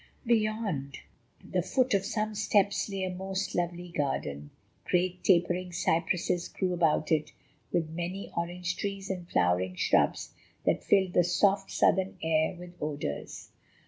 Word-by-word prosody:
Beyond 215 - 0 0.5
the - - -1
foot 255 -1 +1
of 195 -1 +2
some 215 -1 -1
steps 205 -1 +2
lay 195 -1 -3
a 185 - -1
most 190 +1 -3
lovely 175 0 -2
garden. 75 - -2 0.4
Great, 180 0 0
tapering 180 0 +2
cypresses 175 0 0
grew 185 -2 -2
about 165 -3 +2
it, 155 -1 +1 0.4
with 165 -2 +1
many 175 +4 -5
orange 180 +2 -2
trees 195 -1 -3
and 180 -2 -6
flowering 90 +1 +1
shrubs - - +2 0.3
that - - +2
filled 190 -2 +3
the 175 - +5
soft, 195 +3 +2
southern 190 +1 +2
air 160 +1 +2
with 175 0 -10
odours. 145 - -4
180 Hz, 140 wpm, -29 LUFS, 165-195 Hz, 0.5 s, the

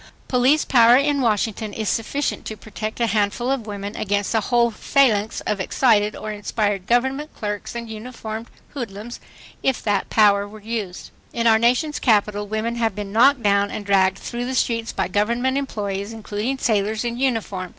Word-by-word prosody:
Police 260 +4 +3
power 240 -1 +6
in 280 0 +1
Washington 220 -2 0
is 220 0 -3
sufficient 265 +7 -1
to 220 - -6
protect 215 +1 -6
a 235 - +3
handful 215 +3 0
of 255 -5 -2
women 205 0 -5
against 205 0 -1
a 225 - +3
whole 235 +2 +2
phalanx 220 -3 +1
of 210 - -2
excited 210 +1 +2
or 215 - -5
inspired 205 -2 -2
government 265 +5 +1
clerks 210 +1 -5
and 235 -1 -5
uniformed 220 0 -7 0.2
hoodlums, 235 -3 -7 0.4
if 265 -2 0
that 205 -2 0
power 205 -2 +4
were 215 +1 -12
used.... 210 -4 -5 0.2
In 235 - -1
our 220 -1 +5
nation's 250 +6 +1
capital, 205 -3 +2
women 220 +3 -2
have 225 -4 0
been 205 -1 -5
knocked 250 +4 +4
down 200 0 +3
and 205 - -6
dragged 190 -1 +3
through 240 +3 -5
the 260 +1 -3
streets 230 -2 0
by - - -1
government 235 +5 0
employees—including 215 -1 -3
sailors 215 -1 0
in 235 0 -2
uniform. 220 -8 -1
220 Hz, 170 wpm, -22 LUFS, 205-240 Hz, 0.4 s, power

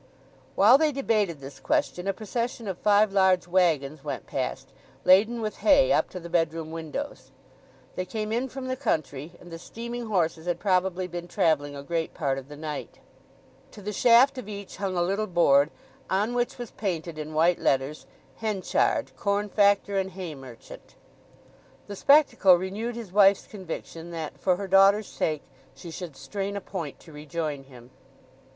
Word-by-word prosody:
While 235 +7 +7
they 310 -1 +3
debated 215 - 0
this 135 0 -10
question 290 - -1
a 195 - +1
procession 230 +2 -4
of 190 -2 -4
five 205 0 +3
large 190 -2 +3
waggons 155 -6 +1
went 140 -3 -5
past, 130 -2 -4 0.4
laden 215 +6 +5
with 215 -1 -3
hay 280 -3 +4
up - - +2
to 185 - -7
the 170 - -9
bedroom 165 -2 -1
windows. 165 - -6 0.7
They 185 - -2
came 215 +3 -4
in 245 +4 -1
from 260 +1 -6
the 255 - -1
country, 155 - -2
and 175 - -14
the 165 - -7
steaming 235 +5 -6
horses 170 -5 0
had 175 - -1
probably 185 -2 +1
been 175 0 -6
travelling 145 -4 +1
a 140 - -7
great 165 +1 -3
part 135 -3 -1
of 135 - -13
the 145 - -10
night. 150 -2 -6 0.7
To - - -13
the 210 +1 -4
shaft 245 +5 +5
of 215 -4 -8
each 200 -1 -8
hung 190 -2 -2
a 175 - +2
little 200 +4 -1
board, 150 -5 +4 0.4
on 205 +5 +1
which 245 0 -1
was 240 -3 -7
painted 170 -5 -4
in 155 0 -6
white 170 +3 +3
letters, 135 +3 0 0.3
"Henchard, 215 -4 0
corn 205 0 -1
factor 200 -1 +3
and 190 0 -2
hay 180 -4 -6
merchant." 130 -4 -13 0.9
The 205 - -7
spectacle 275 -8 +5
renewed 200 +7 -4
his 230 -6 -8
wife's 200 0 +5
conviction 170 -3 -8
that, 165 -3 -6
for 185 - +2
her 200 +2 -5
daughter's 195 +2 +5
sake, 155 -5 -2 0.3
she 170 - -10
should 165 -3 -7
strain 195 +9 -4
a - - -2
point 170 -7 -6
to 160 - -15
rejoin 150 -2 -4
him. 125 -2 -15
185 Hz, 170 wpm, -26 LUFS, 160-210 Hz, 0.9 s, While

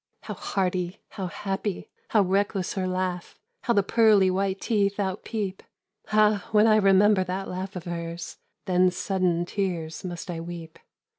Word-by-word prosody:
"How - - -6
hearty, 185 -1 -2
how 190 -2 -5
happy, 195 +3 -4 0.2
how 215 -3 +4
reckless 195 0 0
her 185 -2 -1
laugh! 185 -1 -3 0.3
How 235 - +3
the 200 - +4
pearly 210 -3 +4
white 195 +1 0
teeth 205 -3 +1
outpeep! 195 0 -3 0.5
Ah! 210 -2 +3
when 210 0 +5
I 215 -1 +6
remember 195 0 +5
that 185 +2 -4
laugh 185 +2 -5
of 180 - -5
hers, 170 -1 -5 0.3
Then 185 0 +4
sudden 180 -2 0
tears 175 -5 -3
must 175 -1 -5
I 165 - -4
weep. 165 -1 -8
190 Hz, 150 wpm, -26 LUFS, 180-200 Hz, 0.5 s, I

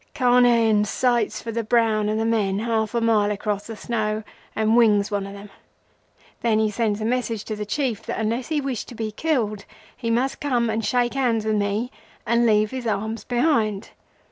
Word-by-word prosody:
Carnehan 240 -4 +4
sights 240 +1 0
for 230 - -4
the 230 +1 -2
brown 220 -2 +2
of 215 - 0
the 225 - 0
men 210 -4 +1
half 220 0 -1
a 235 - +1
mile 220 -3 +3
across 210 0 -3
the 225 - -6
snow 215 -2 -2 0.3
and 220 +1 +2
wings 215 -3 +4
one 200 -1 -2
of 200 - -9
them. 200 0 -11 0.9
Then 225 -2 +2
he 215 -1 +1
sends 215 -1 -1
a - - -1
message 230 -3 -1
to 215 - -4
the 210 0 -5
Chief 255 -3 -2
that, - - -3
unless 230 +3 -1
he 310 -2 0
wished 270 -5 -3
to 245 - -10
be 220 -1 -3
killed, 215 -6 -1 0.3
he 230 - -4
must 250 +4 0
come 240 -5 0
and 220 +1 -2
shake 245 +1 +1
hands 240 -5 0
with 215 -1 +1
me 205 +5 -1 0.3
and 235 +1 +3
leave 215 -1 +3
his 255 -2 -4
arms 220 0 -2
behind. 240 -6 0
225 Hz, 195 wpm, -23 LUFS, 210-240 Hz, 0.9 s, Carnehan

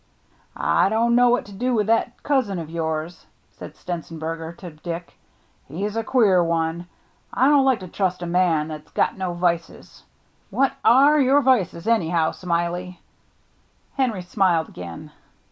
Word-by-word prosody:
" - - -36
I - - +2
don't 230 +2 +2
know 245 0 +5
what 245 - +1
to 205 - -13
do 245 +5 -1
with 210 -2 +1
that 230 +2 0
cousin 255 -10 0
of 165 -2 -6
yours," 160 0 -4 0.2
said - - -11
Stenzenberger 165 -1 -6
to 180 -3 -9
Dick. 170 +3 -7 0.3
" - - -39
He's 200 +9 -4
a 225 - -1
queer 205 -7 +3
one. 165 +1 -1 0.4
I 260 - +2
don't 285 -2 +5
like 260 -6 +2
to 185 - -7
trust 180 0 -2
a - - -3
man 170 -3 +1
that's 155 -1 -9
got - - +1
no 185 -2 -4
vices. 170 -1 -3 0.5
What 275 0 +1
are 275 +6 +6
your 275 +2 +4
vices, 200 -10 +1
anyhow. 170 -8 +2
Smiley?" 175 +1 -3 0.9
Henry 235 -9 -1
smiled 175 -3 +1
again. 90 - -9
180 Hz, 160 wpm, -22 LUFS, 165-230 Hz, 0.9 s, are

